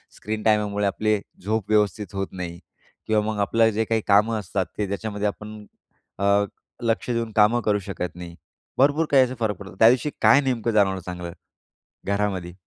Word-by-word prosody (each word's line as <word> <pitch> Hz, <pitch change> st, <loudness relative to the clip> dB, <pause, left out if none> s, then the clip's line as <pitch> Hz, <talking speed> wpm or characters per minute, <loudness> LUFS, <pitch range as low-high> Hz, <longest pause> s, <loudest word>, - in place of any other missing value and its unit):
Screen 110 Hz, 0 st, -5 dB
टाइममुळे 105 Hz, -2 st, +1 dB
आपली 105 Hz, +2 st, +1 dB, 0.2 s
झोप 110 Hz, 0 st, -2 dB
व्यवस्थित 105 Hz, -2 st, +1 dB
होत 95 Hz, 0 st, -2 dB
नाही 85 Hz, -2 st, -6 dB, 0.5 s
किंवा 110 Hz, -1 st, +2 dB
मग 110 Hz, -1 st, -2 dB
आपलं 115 Hz, +3 st, +3 dB
जे 110 Hz, +1 st, 0 dB
काही 110 Hz, 0 st, 0 dB
कामं 105 Hz, +2 st, +3 dB
असतात 95 Hz, -1 st, -2 dB
ते 105 Hz, -2 st, -1 dB
त्याच्यामध्ये 105 Hz, +1 st, -2 dB
आपण 105 Hz, +1 st, -7 dB, 0.5 s
अ, 100 Hz, +1 st, +3 dB, 0.4 s
लक्ष 115 Hz, +1 st, -1 dB
देऊन 115 Hz, -1 st, -2 dB
कामं 110 Hz, +3 st, +4 dB
करू 105 Hz, -2 st, +1 dB
शकत 90 Hz, -2 st, -5 dB
नाही. 85 Hz, -1 st, -9 dB, 0.4 s
भरपूर 145 Hz, +4 st, +3 dB
काही 135 Hz, -2 st, +6 dB
असा 130 Hz, 0 st, -2 dB
फरक 110 Hz, -3 st, 0 dB
पडतो 95 Hz, 0 st, -11 dB
त्यादिवशी 120 Hz, +5 st, +5 dB
काय 140 Hz, -, +6 dB
नेमकं 120 Hz, -4 st, -1 dB
जाणवलं 95 Hz, -3 st, +2 dB
चांगलं 90 Hz, -1 st, -6 dB, 0.7 s
घरामध्ये? 100 Hz, -3 st, -1 dB
105 Hz, 165 wpm, -24 LUFS, 100-110 Hz, 0.7 s, काही